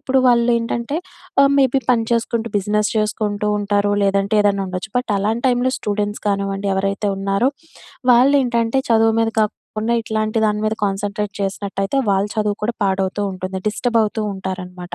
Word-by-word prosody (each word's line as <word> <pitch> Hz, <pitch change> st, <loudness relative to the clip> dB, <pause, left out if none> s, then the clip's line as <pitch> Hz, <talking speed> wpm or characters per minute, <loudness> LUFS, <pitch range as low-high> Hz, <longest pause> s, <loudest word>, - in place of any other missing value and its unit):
ఇప్పుడు 265 Hz, -2 st, +1 dB
వాళ్ళేంటంటే 235 Hz, +2 st, +1 dB, 0.5 s
ఆహ్, 275 Hz, -, +5 dB
మేబీ 265 Hz, 0 st, +3 dB
పని 230 Hz, -2 st, +2 dB
చేసుకుంటూ, 230 Hz, 0 st, 0 dB
బిజినెస్ 210 Hz, +1 st, 0 dB
చేసుకుంటూ 210 Hz, -1 st, -1 dB
ఉంటారు 205 Hz, 0 st, +1 dB
లేదంటే 200 Hz, +2 st, +1 dB
ఏదైనా 200 Hz, -1 st, +2 dB
ఉండొచ్చు. 185 Hz, +3 st, -5 dB
బట్ 250 Hz, -3 st, -4 dB
అలాంటి 220 Hz, +5 st, -1 dB
టైంలో 250 Hz, +1 st, +1 dB
స్టూడెంట్స్ 205 Hz, 0 st, -2 dB
కానివ్వండి 200 Hz, 0 st, -1 dB
ఎవరైతే 195 Hz, +1 st, -1 dB
ఉన్నారో 195 Hz, +6 st, +1 dB, 0.6 s
వాళ్ళేంటంటే, 250 Hz, -1 st, +3 dB
చదువు 225 Hz, 0 st, +4 dB
మీద 225 Hz, -, +2 dB
కాకుండా 215 Hz, +2 st, -2 dB
ఇట్లాంటి 215 Hz, 0 st, -1 dB
దాని 210 Hz, 0 st, -1 dB
మీద 220 Hz, -, 0 dB
కాన్సంట్రేట్ 200 Hz, +1 st, -3 dB
చేసినట్టయితే, 195 Hz, +4 st, -2 dB
వాళ్ళ 195 Hz, +1 st, +2 dB
చదువు 210 Hz, -1 st, 0 dB
కూడా 230 Hz, +2 st, -1 dB
పాడవుతూ 195 Hz, +1 st, 0 dB
ఉంటుంది, 185 Hz, 0 st, -5 dB
డిస్టర్బ్ 230 Hz, +2 st, +1 dB
అవుతూ 215 Hz, +1 st, -3 dB
ఉంటారనమాట. 180 Hz, -2 st, -6 dB
210 Hz, 145 wpm, -19 LUFS, 195-230 Hz, 0.6 s, ఆహ్